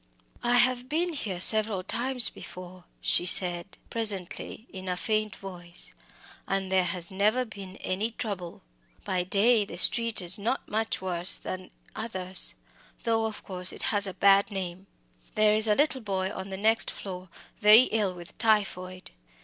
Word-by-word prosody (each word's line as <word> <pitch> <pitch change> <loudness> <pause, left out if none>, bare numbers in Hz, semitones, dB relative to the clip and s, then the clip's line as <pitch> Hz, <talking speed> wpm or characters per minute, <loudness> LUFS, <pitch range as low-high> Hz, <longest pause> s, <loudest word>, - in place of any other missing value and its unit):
"I 240 0 +2
have 250 +1 +3
been 335 +3 -1
here 200 - -4
several 215 -1 +3
times 250 +4 0
before," 180 0 -11 0.2
she - - +2
said 175 0 +6
presently, 215 -1 -1
in 190 -1 -7
a 180 - -2
faint 215 0 -1
voice, 175 -2 -7 0.5
"and 195 -1 -2
there 185 -1 +3
has 175 0 -1
never 215 +6 +1
been 200 -4 -10
any 200 +5 -2
trouble. 200 -7 -6 0.4
By 185 -1 -1
day 210 +5 +3
the 200 - -9
street 230 -1 +4
is 180 +2 -2
not 230 +6 -2
much 220 -1 -2
worse 180 -1 +1
than 185 0 -7 0.3
others 190 -4 -4 0.5
though, 225 -1 +1
of 220 -1 -5
course, 180 -1 -2
it - - -7
has 205 -1 +1
a 190 - -7
bad 200 +1 +4
name. 190 -1 -6 0.5
There 215 0 +4
is 215 +1 +5
a 210 - +3
little 270 -1 +1
boy 190 -3 -2
on 190 +1 -7
the 190 - -6
next 220 +3 +2
floor 185 -2 -8 0.3
very 215 +3 +8
ill 205 -4 0
with 175 -1 -12
typhoid. 185 -5 -1
200 Hz, 160 wpm, -27 LUFS, 185-220 Hz, 0.5 s, very